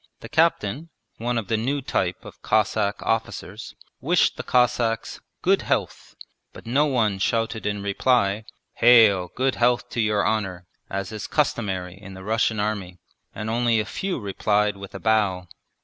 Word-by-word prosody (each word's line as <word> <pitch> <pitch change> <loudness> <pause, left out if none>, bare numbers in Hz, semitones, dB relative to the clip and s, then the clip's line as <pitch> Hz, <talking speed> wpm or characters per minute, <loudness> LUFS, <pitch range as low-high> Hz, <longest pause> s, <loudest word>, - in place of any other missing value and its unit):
The - - -9
captain 160 -2 +1 0.3
one 120 +1 -1
of 110 -4 -3
the 110 - +1
new 135 +6 -1
type 95 -8 -2
of - - -12
Cossack 105 -1 +1
officers 115 0 -3 0.2
wished - - +2
the - - -5
Cossacks 120 -2 +1 0.2
'Good - - +3
health,' - - -2 0.4
but - - -12
no 140 +6 +2
one 110 -8 +1
shouted 110 +1 -1
in 105 -1 -2
reply, 105 0 +1 0.3
'Hail! 110 -7 +6
Good 130 +1 +1
health 120 0 +2
to 120 - -1
your 105 -1 +1
honour,' 95 -5 -2 0.2
as 95 0 -4
is 110 -1 -6
customary 95 - -1
in 100 -2 -10
the 95 - -10
Russian 110 +1 0
Army, 100 -4 -3 0.4
and 110 - -5
only 115 0 +2
a 110 - -1
few 190 -5 -3
replied 105 0 0
with 100 0 -10
a - - -5
bow. 100 -5 +1
110 Hz, 160 wpm, -24 LUFS, 100-120 Hz, 0.4 s, Hail